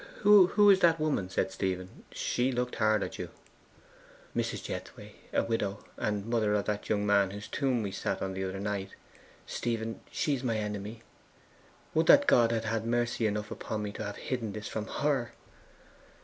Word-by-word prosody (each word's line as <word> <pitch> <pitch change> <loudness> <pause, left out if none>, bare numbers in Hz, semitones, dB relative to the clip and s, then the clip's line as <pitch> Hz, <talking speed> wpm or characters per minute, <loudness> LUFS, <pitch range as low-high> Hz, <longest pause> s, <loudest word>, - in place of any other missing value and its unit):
'Who 205 0 +7
is 190 - +5
that 165 -3 +4
woman?' 150 -12 0
said 95 - 0
Stephen. 95 -1 -4
'She 125 +2 0
looked 125 0 -2
hard 110 -1 +3
at - - -6
you.' - - -4 1.1
'Mrs. - - -2
Jethway - - -7 0.2
a - - +2
widow, 105 -3 -2
and 105 -1 -2
mother 110 -3 +1
of 105 - 0
that 105 -1 -3
young 105 -1 +1
man 100 -2 +4
whose 100 +1 -7
tomb 130 -5 0
we 100 - -3
sat - - -2
on 95 0 -3
the 95 0 -3
other 95 0 -4
night. 100 -1 -3 0.5
Stephen, 115 -1 -3
she 150 - 0
is 135 -1 -2
my 115 -3 0
enemy. 105 +1 -4 0.9
Would 160 0 +2
that 285 0 +8
God 120 - +5
had 115 -1 -1
had 110 0 -1
mercy 120 -1 0
enough 105 0 -3
upon 105 -1 -4
me 105 - -3
to 110 - -6
have 105 0 -5
hidden 115 -6 -3
this 105 +1 -6
from 110 0 -4
HER! 135 -5 -1
110 Hz, 180 wpm, -30 LUFS, 105-125 Hz, 1.1 s, that